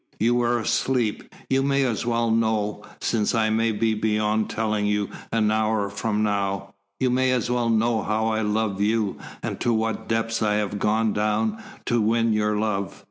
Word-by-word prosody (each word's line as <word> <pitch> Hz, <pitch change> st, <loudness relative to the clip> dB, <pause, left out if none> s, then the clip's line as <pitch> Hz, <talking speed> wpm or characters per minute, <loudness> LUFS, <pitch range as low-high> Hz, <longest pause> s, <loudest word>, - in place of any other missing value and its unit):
You 115 Hz, +3 st, +3 dB
were 120 Hz, 0 st, +2 dB
asleep. 120 Hz, 0 st, -1 dB, 0.2 s
You 135 Hz, 0 st, +2 dB
may 140 Hz, 0 st, +2 dB
as 120 Hz, -2 st, -1 dB
well 115 Hz, -1 st, +1 dB
know, 110 Hz, -2 st, 0 dB, 0.2 s
since 115 Hz, +1 st, 0 dB
I 110 Hz, -1 st, +2 dB
may 115 Hz, +1 st, +2 dB
be 110 Hz, +1 st, +1 dB
beyond 110 Hz, 0 st, 0 dB
telling 110 Hz, -2 st, -1 dB
you 105 Hz, -1 st, 0 dB, 0.2 s
an 110 Hz, -2 st, +2 dB
hour 110 Hz, -2 st, 0 dB
from 105 Hz, +1 st, -1 dB
now. 100 Hz, -2 st, -1 dB, 0.3 s
You 130 Hz, -1 st, +2 dB
may 130 Hz, +1 st, +2 dB
as 125 Hz, -2 st, 0 dB
well 120 Hz, -1 st, +1 dB
know 115 Hz, 0 st, +2 dB
how 110 Hz, +2 st, 0 dB
I 110 Hz, 0 st, 0 dB
love 105 Hz, -2 st, -1 dB
you, 105 Hz, -1 st, 0 dB, 0.2 s
and -, -, -4 dB
to 120 Hz, -, +1 dB
what 110 Hz, -1 st, -1 dB
depths 115 Hz, 0 st, -1 dB
I 105 Hz, -1 st, +2 dB
have 105 Hz, -1 st, -1 dB
gone 110 Hz, +1 st, +1 dB
down 110 Hz, -, 0 dB, 0.2 s
to 120 Hz, -1 st, +1 dB
win 115 Hz, +1 st, +2 dB
your 105 Hz, 0 st, +1 dB
love." 105 Hz, -2 st, -2 dB
110 Hz, 185 wpm, -24 LUFS, 105-115 Hz, 0.3 s, You